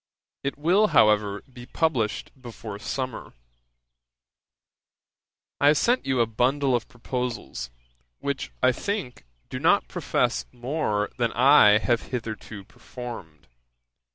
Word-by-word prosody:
It 140 Hz, -, -3 dB
will, 180 Hz, +8 st, +3 dB
however, 105 Hz, -1 st, +3 dB
be 125 Hz, -2 st, -13 dB
published 130 Hz, -9 st, -1 dB
before 115 Hz, -4 st, -8 dB
summer. 130 Hz, +3 st, -5 dB, 2.3 s
'I 140 Hz, -, +4 dB
have 150 Hz, +1 st, +6 dB
sent 245 Hz, -, +1 dB
you 130 Hz, -2 st, +1 dB
a -, -, +4 dB
bundle 130 Hz, +4 st, +1 dB
of 120 Hz, -, -2 dB
proposals, 120 Hz, -, -5 dB, 0.5 s
which, 140 Hz, -1 st, -4 dB
I 130 Hz, -, +6 dB
think, 130 Hz, -, -4 dB, 0.3 s
do -, -, -4 dB
not -, -, +3 dB
profess -, -, -1 dB
more 120 Hz, -5 st, -2 dB
than 120 Hz, -1 st, +1 dB
I 125 Hz, -5 st, +7 dB
have 120 Hz, +1 st, 0 dB
hitherto 110 Hz, -4 st, -6 dB
performed. 95 Hz, -, -10 dB
120 Hz, 115 wpm, -25 LUFS, 110-135 Hz, 2.3 s, I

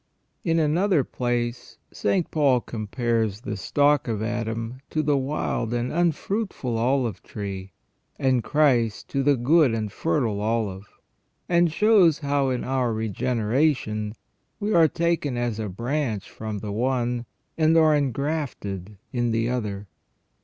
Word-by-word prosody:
In 165 Hz, -1 st, +1 dB
another 165 Hz, +1 st, +2 dB
place 120 Hz, -1 st, -3 dB, 0.2 s
St. 185 Hz, -4 st, 0 dB
Paul 140 Hz, -5 st, +3 dB
compares 110 Hz, -1 st, -2 dB
the 110 Hz, -4 st, -4 dB
stock 145 Hz, +7 st, +2 dB
of 110 Hz, -2 st, -2 dB
Adam 115 Hz, +1 st, -3 dB
to 155 Hz, -, 0 dB
the 145 Hz, -1 st, +2 dB
wild 130 Hz, -4 st, -1 dB
and 120 Hz, +1 st, -2 dB
unfruitful 175 Hz, -, -1 dB
olive 120 Hz, -4 st, 0 dB
tree, 95 Hz, -2 st, -6 dB, 0.4 s
and 130 Hz, -3 st, +2 dB
Christ 125 Hz, -8 st, +2 dB
to 140 Hz, -, 0 dB
the 140 Hz, 0 st, +3 dB
good 135 Hz, 0 st, +4 dB
and 110 Hz, -2 st, -3 dB
fertile 100 Hz, +5 st, 0 dB
olive, 105 Hz, -3 st, -1 dB, 0.6 s
and 170 Hz, -1 st, +3 dB
shows 190 Hz, -4 st, +5 dB
how 140 Hz, -2 st, 0 dB
in 125 Hz, -1 st, -1 dB
our 130 Hz, -2 st, 0 dB
regeneration 110 Hz, -, 0 dB, 0.4 s
we 210 Hz, 0 st, -1 dB
are 165 Hz, -2 st, +6 dB
taken 165 Hz, -5 st, 0 dB
as 120 Hz, -3 st, -1 dB
a 110 Hz, -2 st, -3 dB
branch 115 Hz, +1 st, -2 dB
firom 110 Hz, -2 st, -5 dB
the 105 Hz, -, -4 dB
one, 120 Hz, +1 st, -1 dB, 0.3 s
and 160 Hz, 0 st, +4 dB
are 155 Hz, -1 st, +5 dB
engrafted 135 Hz, -, -2 dB, 0.2 s
in 120 Hz, -1 st, +1 dB
the 115 Hz, +1 st, 0 dB
other. 105 Hz, -5 st, -3 dB
125 Hz, 135 wpm, -25 LUFS, 110-150 Hz, 0.6 s, are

